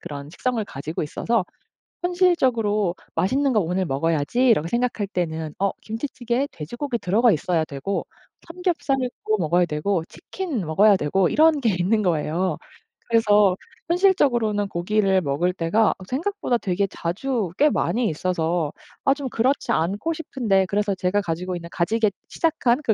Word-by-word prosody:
그런 145 -4 -7
식성을 240 +4 -1
가지고 150 0 -5
있어서 215 +7 -1 0.6
현실적으로 255 - +2 0.2
'맛있는 260 - +1
거 215 - +4
오늘 185 +1 0
먹어야지.'라고 165 - +1
생각할 235 -1 -1
때는 160 -5 -3
어 200 0 +2
김치찌개에 240 +2 -2
돼지고기 240 - -4
들어가 220 +6 +3
있어야 165 0 0
되고 145 +7 -3 0.4
삼겹살도 275 - -1
먹어야 175 +1 +2
되고 165 +3 -1
치킨 320 - -5
먹어야 200 +7 +5
되고 185 +4 +1
이런 315 0 +4
게 225 -7 +2
있는 210 +5 +2
거예요. 170 0 0 0.5
그래서 210 -4 +4 0.3
현실적으로는 245 - +2
고기를 195 +1 +1
먹을 160 +4 0
때가 190 +5 +2
어 - - -5
생각보다 315 -2 -1
되게 195 -1 0
자주 205 +5 -2
꽤 300 - +5
많이 235 -1 0
있어서 165 -1 -1 0.3
아 275 - +5
좀 280 -2 -5
그렇지 255 +5 0
않고 200 - 0
싶은데 230 -11 0
그래서 205 +1 0
제가 185 +2 0
가지고 180 +1 -3
있는 170 -1 -8
가지게 215 +4 +1 0.2
시작한 290 -7 +1
그 225 - +3
205 Hz, 350 characters per minute, -23 LUFS, 175-250 Hz, 0.6 s, 먹어야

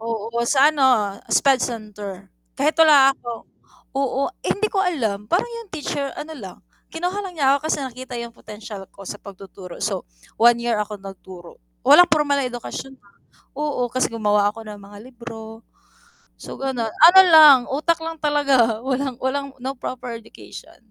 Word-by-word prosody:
Oo, 225 -1 -4 0.2
sa 275 +3 +4
ano, 295 -3 +1
ah, 220 -6 +3 0.2
SPED 270 -2 +3
center. 205 -4 -7 0.3
Kahit 295 +3 0
wala 295 -4 +7
ako 240 -3 -9 0.5
oo, 275 +1 -1 0.2
hindi 425 +1 0
ko - - -4
alam, 245 - -1
parang 365 - 0
'yong 465 -3 -9
teacher 285 -3 -4
ano 315 - -8
lang, 195 -7 -10 0.4
kinuha 355 +4 -3
lang 370 - -8
niya 280 -4 +2
ako 290 - -11
kasi 315 - 0
nakita 255 -1 -8
'yong 235 0 -5
potential 210 -3 -10
ko - - -14
sa 200 - -7
pagtuturo. 195 -2 -12
So, - - -3 0.3
1 235 +1 +4
year 235 -2 0
ako 210 -1 -5
nagturo. 190 -3 -12 0.2
Walang 355 - +7
pormal 295 -3 +1
na 270 - -1
edukasyon, 245 +2 -7
ah. 200 0 -27 0.4
Oo, 290 -5 -2
kasi 255 +2 0
gumawa 210 -2 +1
ako 225 - -10
ng 205 -1 -9
mga 200 +1 -14
libro. 225 -2 -11 0.7
So, - - -9
gano'n. 260 -4 -2
Ano 350 - +7
lang, 310 -5 +9 0.2
utak 315 +4 +1
lang 325 0 -6
talaga. 275 -7 +2
Walang 265 -1 -2
walang 275 +2 -2
no 260 +2 -4
proper 250 -1 -6
education. 225 - -14
250 Hz, 165 wpm, -21 LUFS, 215-290 Hz, 0.7 s, lang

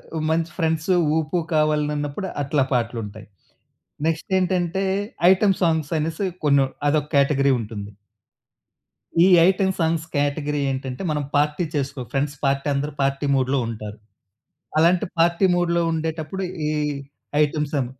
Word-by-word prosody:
ఓ - - -1
మంచి 165 +1 0
ఫ్రెండ్సు, 160 +1 +1 0.2
ఊపు, 160 +2 -1 0.2
కావాలి 150 -1 +2
నన్నప్పుడు 145 +6 -3
అట్లా 140 -1 +1
పాటలుంటాయి. 115 -3 -3 0.8
నెక్స్ట్ 165 0 -2
ఏంటంటే 185 0 0 0.5
ఐటెమ్ 190 0 +3
సాంగ్స్ 160 -3 +1
అనేసి 165 +5 -2 0.2
కొన్ని 140 -2 +4 0.2
అదొకేటగరీ 140 -2 +2
ఉంటుంది. 105 -2 -7 1.3
ఈ - - +6 0.2
ఐటెమ్ 190 0 +2
సాంగ్స్ 160 -1 0
కేటగరీ 145 +1 0
ఏంటంటే 130 +3 -5
మనం 150 -1 -1
పార్టీ 150 +3 +2
చేసుకో 140 -1 -2
ఫ్రెండ్స్ 145 +1 -1
పార్టీ 140 +1 0
అందరూ 145 +2 -2
పార్టీ 135 +1 0
మూడ్‌లో 130 +1 +1
ఉంటారు. 110 -2 -6 0.8
అలాంటి 175 +5 +4
పార్టీ 170 +3 +3
మూడ్‌లో 170 -1 +1
ఉండేటప్పుడు 160 +3 -3 0.3
ఈ - - 0 0.7
ఐటెమ్సం, 150 -2 -1
150 Hz, 120 wpm, -22 LUFS, 140-165 Hz, 1.3 s, ఈ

